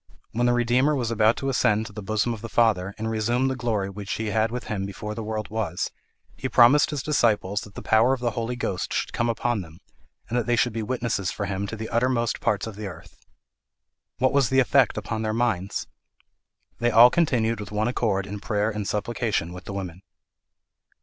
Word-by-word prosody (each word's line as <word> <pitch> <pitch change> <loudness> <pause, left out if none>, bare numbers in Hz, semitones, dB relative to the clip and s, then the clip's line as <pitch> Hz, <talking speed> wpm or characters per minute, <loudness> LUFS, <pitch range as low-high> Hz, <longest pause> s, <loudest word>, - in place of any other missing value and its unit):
When 120 +2 +1
the 120 - +3
Redeemer 125 +5 +2
was 120 -4 -1
about 110 0 +3
to 135 - -2
ascend 110 -4 +2
to 105 - -10
the 105 - -6
bosom 110 +4 0
of 110 - -8
the 115 - -6
Father, 100 -5 +2
and 110 +1 -3
resume 120 +4 +1
the 130 - -2
glory 115 -6 -1
which 100 0 -5
he 110 -1 -2
had 110 +2 +2
with 125 +1 -4
him 100 -3 -3
before 105 +2 -5
the 115 - -5
world 110 -1 -4
was, 105 -6 -2 0.4
he 130 - -4
promised 130 +5 +6
his 145 -3 -3
disciples 105 -8 +1
that 105 - -12
the - - -7
power 110 +3 +4
of 135 - 0
the 120 -1 0
Holy 115 +3 -3
Ghost 95 -6 -3
should - - -2
come 120 0 0
upon 115 -1 0
them, 80 -2 -12 0.5
and 120 - -4
that 120 - -3
they 120 - +3
should 120 0 +1
be 115 - -2
witnesses 115 -4 -1
for 100 - -3
him 100 0 -3
to 110 - -5
the 110 0 -5
uttermost 120 0 +1
parts 105 -1 0
of 110 -3 -7
the 105 -1 -5
earth. 85 -2 -13 0.9
What 130 +2 +2
was 140 -4 +3
the 130 - +3
effect 130 -2 +3
upon 110 +1 -3
their 110 -1 -1
minds? 110 -5 -1 0.9
'They 120 - +2
all 120 +2 +8
continued 115 -9 +1
with 105 - -7
one 105 +2 0
accord 105 -6 0
in 100 +1 -6
prayer 105 0 0
and 105 -2 -4
supplication 105 -5 -1
with 90 +1 -10
the - - -6
women.' 90 -2 -6
110 Hz, 215 wpm, -25 LUFS, 105-120 Hz, 0.9 s, all